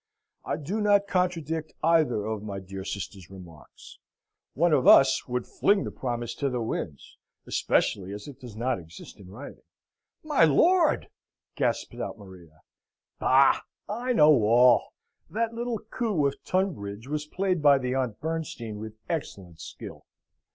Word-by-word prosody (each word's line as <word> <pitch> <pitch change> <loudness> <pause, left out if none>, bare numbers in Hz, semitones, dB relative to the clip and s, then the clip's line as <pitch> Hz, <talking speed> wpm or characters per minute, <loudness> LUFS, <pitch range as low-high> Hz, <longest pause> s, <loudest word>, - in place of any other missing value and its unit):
"I - - -2
do 180 +9 -3
not 205 -1 +4
contradict 165 -5 -1
either 155 -10 +2
of 110 -1 -3
my 100 -2 -5
dear 95 0 -8
sister's 95 -2 -6
remarks. 90 -5 -14 0.6
One 170 +3 +3
of 135 -4 +3
us 135 -1 +6
would 125 -1 -2
fling 200 -1 +2
the - - -5
promise 120 -2 -4
to 140 - 0
the 125 -1 -2
winds, 85 - -5 0.3
especially 95 -1 0
as 105 +4 -8
it 140 - -11
does 120 -4 -11
not 120 -2 -1
exist 85 +5 -13
in 95 -2 -13
writing." 115 +9 -10 0.6
"My 300 - +3
lord!" 335 - +4 0.5
gasps - - -2
out - - -4
Maria. 90 -6 -15 0.6
"Bah! 135 +1 +4 0.3
I 245 +4 -2
know 150 - +6
all. 120 +3 +5 0.4
That 230 +1 -1
little 235 0 -3
coup 215 - -2
of 140 0 -2
Tunbridge 125 - -2
was 150 +1 -3
played 185 0 -1
by 145 -2 +6
the 125 -1 -2
Aunt 125 -5 -2
Bernstein 140 -9 -4
with 110 0 -8
excellent 95 - -5
skill. 90 0 -10
135 Hz, 150 wpm, -27 LUFS, 105-170 Hz, 0.6 s, us